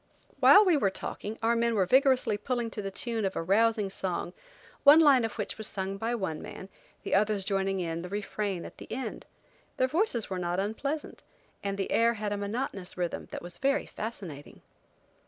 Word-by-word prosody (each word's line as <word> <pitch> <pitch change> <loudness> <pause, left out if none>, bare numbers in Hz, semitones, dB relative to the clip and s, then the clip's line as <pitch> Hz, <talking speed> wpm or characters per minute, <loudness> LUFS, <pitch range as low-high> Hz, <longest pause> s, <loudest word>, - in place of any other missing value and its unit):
While 415 - +8
we 350 -5 +4
were 205 -8 +2
talking 210 +3 -6
our 230 +1 +3
men 235 0 +1
were 195 -3 +3
vigorously 260 0 +4
pulling 235 +1 -2
to 210 - -4
the 195 - -4
time 225 +2 -3
of 190 -1 -1
a - - -1
rousing 210 +2 +2
song, 190 -2 -3 0.5
one 290 +3 +9
line 280 -6 +6
of 225 - -2
which - - -5
was 215 - -3
sung 195 0 -4
by 230 +4 -1
one 190 -8 -3
man, 190 - -9 0.3
the - - -3
others 205 0 +2
joining 195 -1 0
in 165 -1 -3
the 180 - -7
refrain 200 -2 -3
at - - -11
the - - -11
end. 260 +3 -5 0.5
Their 255 - +3
voices 295 - 0
were 185 -1 -3
not 175 +1 -1
unpleasant, 275 +10 -3 0.4
and 200 0 -2
the 195 - -3
air 230 +1 +3
had 210 -1 -2
a - - -2
monotonous 200 -3 -4
rhythm 175 -1 -3
that - - -7
was 175 0 -8
very 275 +2 +1
fascinating. 185 -10 -8
210 Hz, 195 wpm, -29 LUFS, 195-235 Hz, 0.5 s, one